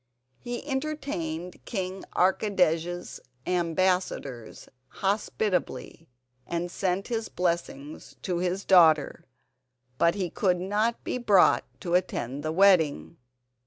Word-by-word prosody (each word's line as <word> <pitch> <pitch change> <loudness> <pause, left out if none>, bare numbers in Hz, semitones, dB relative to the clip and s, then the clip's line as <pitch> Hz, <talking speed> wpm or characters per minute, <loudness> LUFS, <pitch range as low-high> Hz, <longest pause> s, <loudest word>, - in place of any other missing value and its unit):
He 240 +3 -6
entertained 265 - -4
King 190 -3 -4
Archidej's 180 -3 +1 0.3
ambassadors 175 - -1 0.2
hospitably, 195 -4 -2 0.4
and 170 +1 -3
sent 190 +3 -1
his 225 -2 -2
blessing 170 -5 -2 0.2
to 180 -2 -1
his 180 +2 -2
daughter, 160 -5 +4 0.7
but 170 +2 +4
he 185 -4 -2
could 180 -3 +1
not 210 +5 -1
be 250 - -3
brought 205 -6 +4 0.2
to 175 - -3
attend 145 -7 -1
the 155 +1 -2
wedding. 160 - +3
180 Hz, 100 wpm, -27 LUFS, 170-200 Hz, 0.7 s, daughter